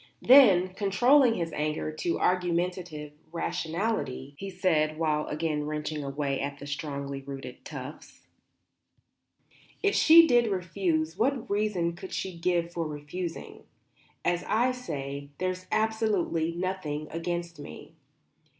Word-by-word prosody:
Then, 205 Hz, -9 st, +7 dB
controlling 230 Hz, +7 st, +4 dB
his 165 Hz, -4 st, -3 dB
anger 150 Hz, +1 st, -2 dB
to 165 Hz, +2 st, -2 dB
argumentative 175 Hz, -4 st, -1 dB, 0.2 s
rationality, 165 Hz, -, -2 dB
he 195 Hz, +7 st, -6 dB
said, 160 Hz, -5 st, +1 dB
while 155 Hz, -2 st, 0 dB
again 150 Hz, -1 st, -2 dB
wrenching 150 Hz, 0 st, -3 dB
away 140 Hz, 0 st, -2 dB
at 140 Hz, 0 st, -3 dB
the 145 Hz, -, -9 dB
strongly 140 Hz, -1 st, -4 dB
rooted 135 Hz, 0 st, -8 dB
tufts: -, -, -9 dB, 1.6 s
"If 405 Hz, -, +3 dB
she 330 Hz, +1 st, +8 dB
did 240 Hz, -6 st, +4 dB
refuse, 175 Hz, -3 st, -1 dB
what 255 Hz, +1 st, +1 dB
reason 200 Hz, -5 st, 0 dB
could 185 Hz, +2 st, -9 dB
she 190 Hz, -2 st, -3 dB
give 170 Hz, 0 st, 0 dB
for 165 Hz, -2 st, -2 dB
refusing? 155 Hz, +4 st, -6 dB, 0.6 s
As 175 Hz, 0 st, +1 dB
I 240 Hz, +4 st, +2 dB
say, 140 Hz, -, -5 dB
there's 185 Hz, 0 st, -3 dB
absolutely 215 Hz, -7 st, +1 dB
nothing 170 Hz, -5 st, -3 dB
against 170 Hz, -1 st, -4 dB
me." 75 Hz, -, -10 dB
170 Hz, 120 wpm, -28 LUFS, 150-195 Hz, 1.6 s, she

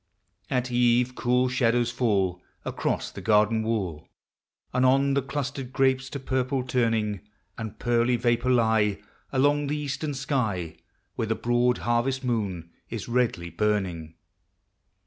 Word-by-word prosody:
At 125 Hz, -1 st, -1 dB
eve, 120 Hz, +1 st, +3 dB
cool 125 Hz, +1 st, +2 dB
shadows 120 Hz, -1 st, +2 dB
fall 100 Hz, -7 st, 0 dB, 0.2 s
Across -, -, -2 dB
the -, -, -8 dB
garden 110 Hz, +1 st, +3 dB
wall. 100 Hz, -9 st, -2 dB, 0.7 s
And 125 Hz, +1 st, +2 dB
on 135 Hz, +2 st, +4 dB
the 140 Hz, -, +2 dB
clustered 135 Hz, -1 st, -4 dB
grapes 135 Hz, 0 st, +1 dB
to 140 Hz, -, -5 dB
purple 130 Hz, 0 st, -1 dB
turning; 115 Hz, -5 st, 0 dB, 0.4 s
And 110 Hz, -2 st, -6 dB
pearly 120 Hz, +1 st, +2 dB
vapors 120 Hz, +1 st, +1 dB
lie 110 Hz, -3 st, +2 dB, 0.3 s
Along 145 Hz, +2 st, +2 dB
the 150 Hz, +2 st, -1 dB
eastern 145 Hz, 0 st, -3 dB
sky, 110 Hz, -, -2 dB, 0.4 s
Where 110 Hz, -, -2 dB
the 115 Hz, -, 0 dB
broad 120 Hz, +1 st, +2 dB
harvest 120 Hz, +3 st, +1 dB
moon 100 Hz, -9 st, -2 dB, 0.2 s
is -, -, -5 dB
redly 115 Hz, -9 st, 0 dB
burning. 85 Hz, -4 st, -1 dB
120 Hz, 130 wpm, -26 LUFS, 110-130 Hz, 0.7 s, on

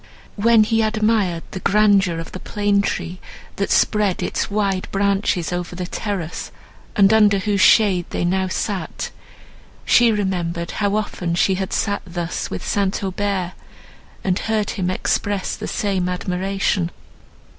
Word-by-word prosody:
When 225 Hz, +1 st, +5 dB
he 225 Hz, +1 st, +1 dB
admired 215 Hz, -5 st, +1 dB
the 190 Hz, -, -5 dB
grandeur 200 Hz, -3 st, +3 dB
of 165 Hz, 0 st, -6 dB
the 185 Hz, -, -7 dB
plane 205 Hz, 0 st, +1 dB
tree, 180 Hz, -2 st, -3 dB, 0.4 s
that 200 Hz, -, -1 dB
spread 210 Hz, -4 st, +2 dB
its -, -, -2 dB
wide 200 Hz, -2 st, 0 dB
branches 195 Hz, -3 st, 0 dB
over 175 Hz, 0 st, -4 dB
the 180 Hz, 0 st, -4 dB
terrace, 185 Hz, -3 st, -4 dB, 0.4 s
and 200 Hz, -1 st, +5 dB
under 210 Hz, -2 st, +5 dB
whose 200 Hz, 0 st, 0 dB
shade 195 Hz, -7 st, +5 dB
they -, -, -2 dB
now 190 Hz, +1 st, +1 dB
sat, 195 Hz, 0 st, -3 dB, 0.7 s
she 235 Hz, -1 st, +5 dB
remembered 175 Hz, -5 st, -2 dB
how 205 Hz, 0 st, +1 dB
often 180 Hz, -5 st, -2 dB
she 190 Hz, +2 st, +3 dB
had 190 Hz, 0 st, -3 dB
sat 200 Hz, -1 st, 0 dB
thus 175 Hz, -1 st, -4 dB
with -, -, -5 dB
St. 200 Hz, -1 st, 0 dB
Aubert, 190 Hz, -1 st, -2 dB, 0.7 s
and 185 Hz, -1 st, 0 dB
heard 220 Hz, -2 st, -1 dB
him 180 Hz, -3 st, -2 dB
express 195 Hz, +1 st, -1 dB
the 215 Hz, -, -6 dB
same 190 Hz, -3 st, -1 dB
admiration. 185 Hz, 0 st, -1 dB
195 Hz, 145 wpm, -21 LUFS, 180-210 Hz, 0.7 s, When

